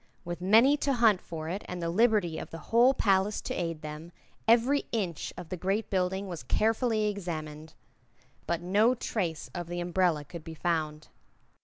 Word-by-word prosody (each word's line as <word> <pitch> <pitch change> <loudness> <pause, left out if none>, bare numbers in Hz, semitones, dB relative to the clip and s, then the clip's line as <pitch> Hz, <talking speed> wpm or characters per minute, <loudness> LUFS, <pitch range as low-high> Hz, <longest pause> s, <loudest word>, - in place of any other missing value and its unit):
With 175 0 -5
many 225 +10 +5
to 285 -1 0
hunt 225 -6 +4
for 160 -2 -6
it 190 +5 -3
and 180 - -5
the 170 -1 -2
liberty 205 -5 +2
of - - -7
the 165 - -7 0.2
whole 245 +3 +6
palace 195 -1 +2
to - - -4
aid 165 -3 -3
them, 155 +2 -7 0.4
every 240 +5 +4
inch 190 -9 -2
of 175 -2 -8
the 185 - -4
great 195 +6 -1
building 190 +1 0
was 175 -4 -6
carefully 220 - +1
examined. 160 -6 -5 0.7
But 170 0 -1
no 210 +7 +3
trace 180 -9 -3
of 175 -2 -5
the 175 +1 -4
umbrella 175 -3 +1
could 170 +1 -9
be 160 0 -8
found. 155 -2 -2
180 Hz, 175 wpm, -29 LUFS, 165-215 Hz, 0.7 s, whole